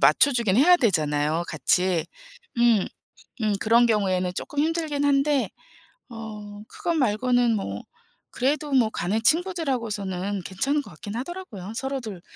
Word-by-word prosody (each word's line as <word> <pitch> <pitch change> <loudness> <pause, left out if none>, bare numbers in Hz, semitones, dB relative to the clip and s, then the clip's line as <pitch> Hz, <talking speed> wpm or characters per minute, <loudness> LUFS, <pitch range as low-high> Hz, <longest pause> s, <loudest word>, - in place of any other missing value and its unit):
맞춰주기는 235 -7 +4
해야 355 +4 +7
되잖아요, 155 - +1
같이. 170 +3 +1 0.5
음. 235 -5 +4 0.6
음. 215 -1 +1
그런 230 +2 +4
경우에는 185 -4 +1
쪼끔 290 - -4
힘들긴 310 -2 0
한데 280 0 +2 0.6
어 210 -3 -9
그것 340 -1 -3
말고는 245 -3 +2
뭐 100 - -4 0.5
그래도 290 +3 -1
뭐 235 -5 +3
가는 200 +5 -1
친구들 340 +2 +2
하고서는 200 -5 -2
괜찮은 275 +12 -1
것 - - -13
같긴 215 -1 -8
하더라고요 245 - -7
서로들 245 -8 -5
225 Hz, 300 characters per minute, -24 LUFS, 195-280 Hz, 0.6 s, 해야